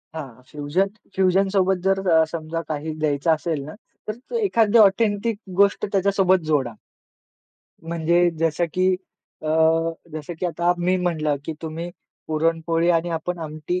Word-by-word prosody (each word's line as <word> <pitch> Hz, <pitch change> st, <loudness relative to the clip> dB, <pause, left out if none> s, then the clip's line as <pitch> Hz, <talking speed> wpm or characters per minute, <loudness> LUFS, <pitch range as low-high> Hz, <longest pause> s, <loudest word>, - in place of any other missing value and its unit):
हां, 130 Hz, -6 st, -8 dB
fusion 150 Hz, +7 st, 0 dB, 0.3 s
fusion 190 Hz, +1 st, +3 dB
सोबत 190 Hz, -1 st, +2 dB
जर 195 Hz, 0 st, +2 dB
अ, 160 Hz, -1 st, +6 dB
समजा 165 Hz, 0 st, -4 dB
काही 155 Hz, 0 st, -3 dB
द्यायचं 145 Hz, +2 st, +1 dB
असेल 155 Hz, -1 st, -2 dB
ना, 155 Hz, -, -8 dB, 0.3 s
तर 240 Hz, -, -6 dB
एखादी 235 Hz, -, +3 dB
ऑथेंटिक 210 Hz, +1 st, +3 dB, 0.2 s
गोष्ट 200 Hz, 0 st, +3 dB
त्याच्यासोबत 195 Hz, -1 st, +3 dB
जोडा. 135 Hz, -7 st, 0 dB, 1.2 s
म्हणजे 170 Hz, +1 st, +2 dB
जसं 165 Hz, +1 st, +1 dB
की 185 Hz, 0 st, +2 dB, 0.6 s
अ, 155 Hz, -, -3 dB, 0.6 s
जसं 155 Hz, +2 st, -6 dB
की 180 Hz, -, -1 dB
आता 175 Hz, +1 st, +1 dB
मी 180 Hz, +2 st, +1 dB
म्हटलं, 155 Hz, -5 st, 0 dB
की 160 Hz, -, -3 dB
"तुम्ही 165 Hz, +2 st, -5 dB, 0.4 s
पुरणपोळी 165 Hz, +1 st, 0 dB
आणि 170 Hz, 0 st, +1 dB
आपण 175 Hz, +2 st, -4 dB
आमटी 155 Hz, +3 st, -4 dB
170 Hz, 140 wpm, -23 LUFS, 155-190 Hz, 1.2 s, अ